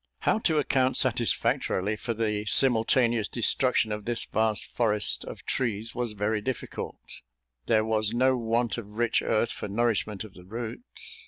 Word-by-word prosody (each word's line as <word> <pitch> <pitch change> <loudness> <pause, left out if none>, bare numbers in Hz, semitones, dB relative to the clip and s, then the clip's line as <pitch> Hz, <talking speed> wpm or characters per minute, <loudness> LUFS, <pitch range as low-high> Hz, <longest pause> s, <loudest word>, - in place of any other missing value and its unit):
How - - +2
to 160 -7 +1
account 130 -3 +2
satisfactorily 100 +3 +1
for 115 +2 -4
the 105 -2 -1
simultaneous 115 -2 +4
destruction 120 -1 +2
of 105 -1 -4
this 120 -1 -2
vast 110 -2 0
forest 105 -4 +1
of - - -9
trees, 115 -3 -2
was 120 -2 -3
very 105 +1 -1
difficult; 130 +4 -6 0.5
there 110 -1 +3
was 110 -1 +1
no 130 +2 +3
want 120 0 0
of 105 -1 -11
rich 120 -1 +2
earth 110 +1 +1
for - - -5
nourishment 105 -1 -1
of 105 -3 -12
the 90 - -14
roots. 245 - -2
115 Hz, 155 wpm, -27 LUFS, 105-120 Hz, 0.5 s, simultaneous